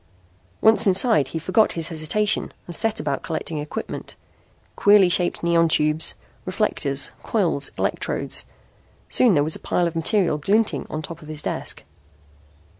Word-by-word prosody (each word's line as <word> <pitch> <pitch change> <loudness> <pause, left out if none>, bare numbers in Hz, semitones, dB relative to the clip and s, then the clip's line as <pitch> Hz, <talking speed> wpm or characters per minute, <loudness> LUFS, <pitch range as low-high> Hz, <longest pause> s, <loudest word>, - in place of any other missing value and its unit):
Once 220 0 +5
inside 185 - +5
he 165 - -6
forgot 185 +7 +2
his 165 0 -1
hesitation 180 +6 -1
and 175 - -6
set 220 +3 +2
about 145 -2 -3
collecting 160 -1 -4
equipment 150 +1 -7 0.6
queerly 205 -2 +5
shaped 175 -1 -1
neon 170 -1 +2
tubes, 155 0 +2 0.3
reflectors, - - -1
coils, - - 0
electrodes. - - -2 0.7
Soon 245 -6 +3
there 145 - +3
was 155 +1 -1
a - - -10
pile 175 - -1
of 170 -1 -3
material 165 -1 +1
glinting 210 +8 0
on 155 0 -5
top 170 -2 -8
of 155 - -13
his 155 -1 -8
desk. - - -5
170 Hz, 145 wpm, -22 LUFS, 155-205 Hz, 0.7 s, Once